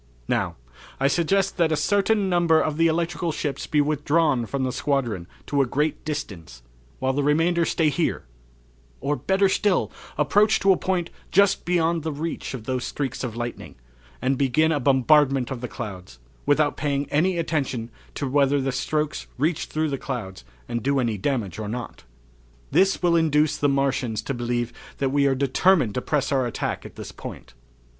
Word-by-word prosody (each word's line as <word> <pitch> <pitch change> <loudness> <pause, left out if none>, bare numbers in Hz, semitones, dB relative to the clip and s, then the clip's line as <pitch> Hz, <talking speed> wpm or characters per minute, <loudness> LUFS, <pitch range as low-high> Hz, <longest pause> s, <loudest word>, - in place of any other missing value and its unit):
"Now, - - 0 0.4
I 135 - +3
suggest 180 +7 +1
that 165 -3 +2
a - - +3
certain 200 +5 +2
number 170 -3 +3
of 155 -1 -1
the 165 0 +4
electrical 170 +1 -1
ships 145 -2 -3
be 150 -2 +3
withdrawn 145 -3 +1
from 135 +2 -2
the 130 - 0
squadron 125 -9 -1 0.2
to 140 -1 +1
a 135 - +1
great 150 +4 -1
distance, 85 - -6 0.3
while 130 0 0
the 145 - 0
remainder 165 +4 +2
stay 160 -1 +2
here; 165 +2 -1 0.8
or, 145 +1 0
better 195 +5 +2
still, 190 0 +1 0.3
approach 210 +1 +3
to 195 - +5
a - - +5
point 180 -2 -1 0.2
just 200 0 +3
beyond 170 -1 +1
the 160 +1 -3
reach 150 -1 -4
of 120 - -8
those 130 +1 -2
streaks 135 -3 -3
of 120 -3 -4
lightning, 120 0 -6 0.5
and 135 0 +1
begin 155 +4 +3
a 150 - +1
bombardment 135 -1 +3
of 125 -3 -4
the 125 - -3
clouds 95 - -8 0.3
without 145 0 +3
paying 140 -2 -1
any 175 +5 +2
attention 135 -8 -2 0.2
to 140 - -2
whether 140 +1 +3
the 135 0 -1
strokes 150 +3 -2
reach 155 +5 0
through 155 0 -1
the 135 -2 -3
clouds 95 - -5 0.2
and 120 - -2
do 140 +3 +1
any 115 -4 0
damage 105 - -2
or 105 -1 -4
not." 120 +1 -6 0.7
"This 190 -1 +3
will 175 -1 +4
induce 155 -2 +3
the 145 - +1
Martians 135 -5 0
to 140 - -3
believe 120 -1 -2 0.2
that 135 -1 0
we 140 0 +3
are 135 - +2
determined 140 - +3
to 125 - -2
press 145 0 -1
our 130 -3 +2
attack 120 - -3
at - - -17
this - - -8
point." - - -9
145 Hz, 180 wpm, -24 LUFS, 130-165 Hz, 0.8 s, to